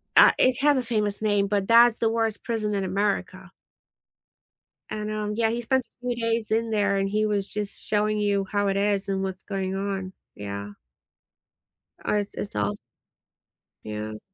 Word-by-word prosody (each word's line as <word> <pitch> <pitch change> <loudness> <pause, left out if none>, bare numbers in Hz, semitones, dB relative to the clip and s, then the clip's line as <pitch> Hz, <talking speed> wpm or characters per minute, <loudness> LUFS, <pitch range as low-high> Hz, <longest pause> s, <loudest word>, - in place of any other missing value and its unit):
Uh, - - +9
it 255 -1 +3
has 290 -1 +4
a 255 - 0
famous 210 -3 -1
name, 205 -2 +2
but 200 -1 0
that's 235 0 +6
the 225 - +2
worst 225 -1 -1
prison 215 -3 -1
in 195 - 0
America. 190 -1 -2 1.4
And, 215 0 -3
um, 210 -1 -2
yeah, 225 0 +2
he 235 - -2
spent 255 +2 +1
a - - -32 0.2
few 245 - 0
days 230 -1 -1
in 225 0 +1
there 205 -2 +2
and 195 0 0
he 215 +1 +1
was 205 -2 0
just 205 -1 -5
showing 210 0 +1
you 200 -1 +1
how 205 -1 +1
it 195 - +1
is 200 -1 +1
and 190 -1 -1
what's 190 -1 -4
going 190 -2 -3
on, 195 -1 -3 0.2
yeah. 100 0 -6 1.4
Uh, - - +2
it's 205 -1 -1
it's 200 - -5
all 105 0 0 1.1
Yeah. 110 0 -5
205 Hz, 175 wpm, -25 LUFS, 195-220 Hz, 1.4 s, Uh